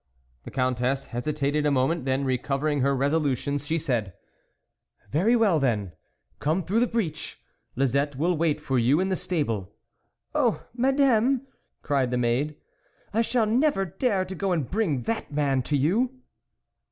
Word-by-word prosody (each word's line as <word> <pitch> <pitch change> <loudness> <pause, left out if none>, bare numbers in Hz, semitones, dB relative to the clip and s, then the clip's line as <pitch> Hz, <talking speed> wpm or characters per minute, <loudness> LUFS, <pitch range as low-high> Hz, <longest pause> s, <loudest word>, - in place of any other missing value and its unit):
The - - -6
Countess 130 +1 0
hesitated 145 +3 -1
a 150 - +3
moment, 140 +2 +1
then, 135 +1 0
recovering 140 +3 0
her 140 +1 +2
resolution, 140 0 0
she 145 +4 -2
said: 120 - -1 0.5
" - - -39
Very 195 - +3
well 210 -9 +3
then; 110 -9 0 0.5
come 160 +5 0
through 200 +7 +1
the 245 - +3
breach; 210 -11 -3 0.4
Lisette 140 +2 +1
will 170 +6 +1
wait 155 -1 +1
for 135 -4 0
you 130 +7 +3
in 190 +1 0
the 190 - +1
stable." 115 - -2 0.6
"Oh! - - +1
Madame," 265 0 +3 0.4
cried 135 -3 +1
the 125 - -1
maid, 125 +5 0 0.6
"I 225 - +3
shall 235 0 +1
never 235 -2 +2
dare 190 - 0
to 190 - -6
go 190 0 -1
and 155 -7 -1
bring 180 - 0
that 225 -8 -3
man 140 -3 +1
to 145 +4 0
you 195 - +2
150 Hz, 155 wpm, -26 LUFS, 135-190 Hz, 0.6 s, a